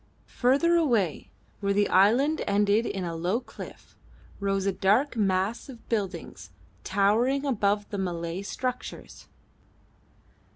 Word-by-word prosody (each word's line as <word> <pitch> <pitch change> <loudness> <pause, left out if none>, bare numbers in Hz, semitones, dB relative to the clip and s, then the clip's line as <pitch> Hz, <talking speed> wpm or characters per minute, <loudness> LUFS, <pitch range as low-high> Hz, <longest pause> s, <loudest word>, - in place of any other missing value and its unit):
Further 285 +8 +4
away, 230 - +1 0.3
where 200 -1 0
the 205 0 +2
island 245 - +4
ended 205 +2 +2
in 190 - -3
a 170 -1 -4
low 180 +7 0
cliff, 250 - -12 0.4
rose 195 -1 -1
a 195 - +2
dark 210 +9 +2
mass 200 +4 0
of 240 -4 -12
buildings 190 - -4 0.3
towering 225 +8 +2
above 205 -5 +1
the 205 - -3
Malay 170 -1 -3
structures. 250 +5 -6
205 Hz, 120 wpm, -27 LUFS, 190-245 Hz, 0.4 s, Further